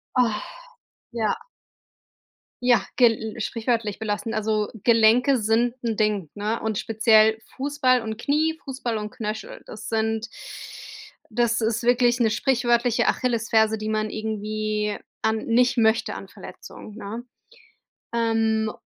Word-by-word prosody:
Ah. 230 -4 +2 0.7
Ja. 220 -3 0 1.3
Ja, 240 -5 +4
gel 225 -2 +2
sprichwörtlich 225 -2 -1
belastend. 220 +1 -3
Also, 215 -1 0
Gelenke 235 +3 +5
sind 230 +3 +1
'n 225 -2 -1
Ding, 210 -7 0
ne? 215 +2 -2
Und 220 -2 -2
speziell 220 0 +4 0.2
Fußball 270 -3 +2
und 220 -1 -5
Knie, 310 +5 0
Fußball 255 -5 -3
und 210 0 -5
Knöchel, 215 -4 -6
das 215 0 -8
sind 220 0 -1 1.0
das 235 0 +1
ist 230 +1 0
wirklich 245 0 +3
'ne 225 -2 +3
sprichwörtliche 240 0 +2
Achillesferse, 220 -2 +2
die 215 0 -4
man 215 0 0
irgendwie 215 -1 -2 0.2
an 220 0 +1
nicht 245 +2 +3
möchte 220 0 +2
an - - -8
Verletzungen, 215 - -11
ne? 225 +2 -6 0.9
Ähm, 225 -1 +1
225 Hz, 120 wpm, -24 LUFS, 215-240 Hz, 1.3 s, Gelenke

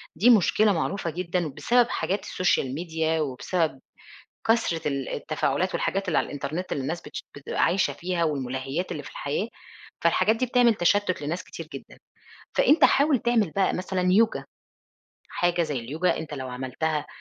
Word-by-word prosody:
دي 205 +10 +4
مشكلة 210 -1 +5
معروفة 175 +1 -2
جدًا 175 +1 -2
بسبب 240 - +2
حاجات 195 +2 -1
السوشيال 140 -8 0
ميديا 160 0 -1
وبسبب 150 +2 -1 0.7
كثرة 220 -9 +1
ال 140 -2 -2
التفاعلات 155 +4 -1
والحاجات 195 0 -1
اللي 170 - +1
على - - -1
الإنترنت 150 +6 -4
اللي 140 - -1
الناس 165 +6 -3
بتش 150 - -8
بتبقى 145 - -2
عايشة 190 +1 +2
فيها 175 -1 -2
والمُلهّيات 135 +2 -2
اللي 145 - -4
في - - -9
الحياة، 145 +9 -2 0.6
فالحاجات 185 +6 +3
دي 255 - 0
بتعمل 245 -1 +4
تشتُّت 195 0 +1
لناس 160 +5 -3
كتير - - -9
جدًا. - - -10 0.6
فأنت - - +5
حاول 285 -1 +4
تعمل 230 -6 +1
بقى 195 - +3
مثلًا 185 0 -2
يوجا، 225 +3 +3 0.8
حاجة 175 0 +1
زي 150 -5 -2
اليوجا 155 +10 0
أنت 155 -2 -6
لو 130 -2 -5
عملتها 130 +5 -2
170 Hz, 155 wpm, -26 LUFS, 145-195 Hz, 0.8 s, مشكلة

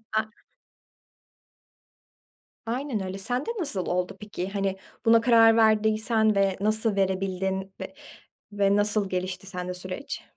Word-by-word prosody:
A 220 0 +1 2.4
Aynen 240 -3 -3
öyle. 190 +1 -5
Sen 245 +7 +1
de - - -5
nasıl 245 - -1
oldu 180 0 -2
peki? 200 -3 -6
Hani 195 -1 -2 0.3
buna 230 0 +5
karar 225 -1 +5
verdiysen 220 0 +3
ve 195 -1 +1
nasıl 215 +1 +1
verebildin 190 0 -1
ve - - -7 0.6
ve 200 -1 +2
nasıl 205 -1 +2
gelişti 185 +1 -4
sende 180 -2 -5
süreç? 185 +8 -6
200 Hz, 120 wpm, -26 LUFS, 190-220 Hz, 2.4 s, buna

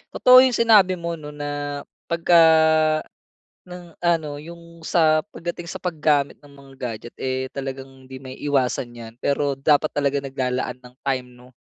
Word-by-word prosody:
Totoo 255 0 +8
'yong 255 -2 +4
sinabi 210 -5 +5
mo 170 -1 -5
'no, 150 -1 -10
na, 145 -1 -5 0.2
pagka 170 +1 +3 1.3
ng 180 -1 -11
ano, 160 -4 -1
'yong 170 +1 -12
sa 155 -2 +3 0.2
pagdating 175 0 -6
sa - - -7
paggamit 150 -5 0
ng 145 -1 -18
mga 140 -1 -16
gadget 120 -2 -7
eh, 130 0 -3
talagang 135 -1 -8
hindi 130 0 -10
maiiwasan 130 -2 -2
'yan, 115 -1 -10
pero 140 +1 -1
dapat 150 +2 +2
talaga 140 -1 -1
naglalaan 130 -2 -3
ng 125 0 -16
time, 130 -2 -2
'no? 125 +1 -18
145 Hz, 150 wpm, -22 LUFS, 130-170 Hz, 1.3 s, Totoo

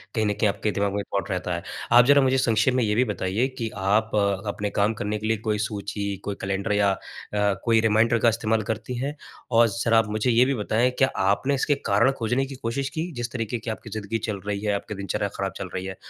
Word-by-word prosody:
कहीं 110 -2 +1
न 105 - +1
कहीं 105 +1 +1
आपके 105 +1 -1
दिमाग 100 -1 -1
में 100 - -1
थॉट 100 -3 -1
रहता 90 -1 -2
है। 85 - -5 0.3
आप 120 +1 +8
ज़रा 145 +1 +6
मुझे 130 0 +3
संक्षेप 120 0 +2
में 125 -1 +2
ये 105 -1 +1
भी 125 - +4
बताइए 105 +2 -1
कि 115 -3 -2
आप 105 +3 +1 0.4
अपने 105 0 -2
काम 105 +2 +1
करने 105 0 -3
के 110 - -3
लिए 110 0 +1
कोई 105 0 -1
सूची, 100 -1 -3
कोई 100 - -2
कैलेंडर 95 +1 -2
या 100 -1 +3
अ, 95 - -3 0.7
कोई 115 -1 +4
रिमाइंडर 115 +1 +3
का 115 - +5
इस्तेमाल 110 -1 0
करती 110 +3 -4
हैं? 140 +4 -3 0.4
और 115 0 +6
ज़रा 115 +1 +1
आप 110 - 0
मुझे 110 +4 +1
ये 120 +2 +5
भी 140 - +1
बताएँ, 115 +3 +1
क्या 130 - +4 0.2
आपने 100 +8 +2
इसके 145 +2 +1
कारण 105 +6 +4
खोजने 125 +4 0
की 135 0 -8
कोशिश 135 +4 -2
की, 170 +3 -2
जिस 120 0 -4
तरीक़े 120 -1 -3
की 115 - -6
आपकी 110 - -8
ज़िंदगी 110 +1 -3
चल 100 -2 -3
रही 100 -1 -1
है, 105 - +1
आपकी 105 +1 -5
दिनचर्या 100 +1 -2
खराब 95 0 -2
चल - - -5
रही 95 0 -3
है, 95 0 -5
110 Hz, 240 wpm, -25 LUFS, 100-120 Hz, 0.7 s, आप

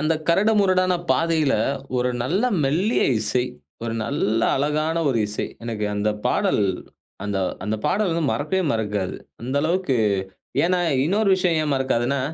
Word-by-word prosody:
அந்த 155 +2 +2
கரடு 200 +6 +4
முரடான 185 -1 +3 0.2
பாதையில, 160 -4 +2 0.4
ஒரு 125 0 +1
நல்ல 170 +11 0 0.2
மெல்லிய 180 - +1 0.2
இசை, 125 +4 0 0.4
ஒரு 115 -1 -2
நல்ல 115 -5 0 0.2
அழகான 155 +4 0
ஒரு 120 -4 +1
இசை. 105 - -3 0.2
எனக்கு 110 -3 -3
அந்த 105 +1 0 0.2
பாடல் 105 - +2 0.6
அந்த 100 -1 -1 0.3
அந்த 105 +2 -1
பாடல் 200 -3 +1
வந்து 165 -1 0
மறக்கவே 185 +6 -1
மறக்காது. 105 -4 -2 0.3
அந்த 130 +3 -4
அளவுக்கு 170 -5 +1 0.7
ஏன்னா 180 +1 +2 0.2
இன்னொரு 205 +5 +1
விஷயம் 175 -3 +1
ஏன் 150 -2 0
மறக்காதுன்னா, 130 0 0
150 Hz, 140 wpm, -23 LUFS, 120-180 Hz, 0.7 s, கரடு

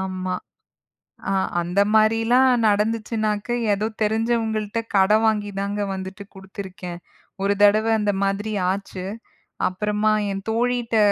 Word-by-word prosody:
ஆமா. 185 -1 -3 1.0
அ - - +1 0.3
அந்த 175 +3 -1
மாதிரிலாம் 225 +4 +4 0.2
நடந்துச்சுன்னாக்க, 215 0 0 0.3
ஏதோ 205 +2 -1 0.2
தெரிஞ்சவங்கள்ட்ட 220 0 0 0.2
கடன் 210 +3 +4
வாங்கிதாங்க 205 -1 -1
வந்துட்டு 190 +1 -7
குடுத்திருக்கேன். 190 -2 -8 0.4
ஒரு 200 - +3
தடவ 215 +2 +5
அந்த 210 -1 +1
மாதிரி 200 +2 -1 0.2
ஆச்சு. 190 -1 -5 0.6
அப்புறமா 210 +3 0 0.2
என் 195 0 -4
தோழிட்ட 235 0 0
210 Hz, 105 wpm, -22 LUFS, 195-220 Hz, 1.0 s, தடவ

